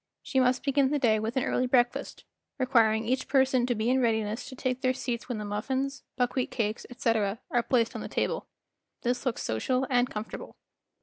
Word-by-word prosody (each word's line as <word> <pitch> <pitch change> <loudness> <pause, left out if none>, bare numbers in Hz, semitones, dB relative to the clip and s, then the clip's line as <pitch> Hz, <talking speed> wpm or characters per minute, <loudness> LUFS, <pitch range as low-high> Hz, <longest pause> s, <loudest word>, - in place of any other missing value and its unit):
She 265 - 0
must 255 0 +2
begin 275 -1 +3
the 295 - +1
day 225 -6 +3
with 225 +4 -3
an 260 - +2
early 255 - +1
breakfast, 245 -1 +1 0.3
requiring 230 -4 +3
each 255 +3 0
person 260 -2 +3
to 245 - +1
be 215 +1 -1
in 260 0 +3
readiness 220 0 0
to 260 - -9
take 255 0 -2
their 255 -1 +2
seats 245 -2 -4
when 245 - -2
the 210 - -4
muffins, 265 +6 -2 0.2
buckwheat 250 0 0
cakes, 215 -2 -2
etc., 230 -5 0
arc 240 -1 0
placed 235 -3 +3
on - - -5
the - - -5
table. - - -1 0.6
This 245 +1 0
looks 245 - -1
social 255 - 0
and 245 0 +3
comfor 210 +1 -5
table. - - -8
245 Hz, 200 wpm, -28 LUFS, 225-260 Hz, 0.6 s, begin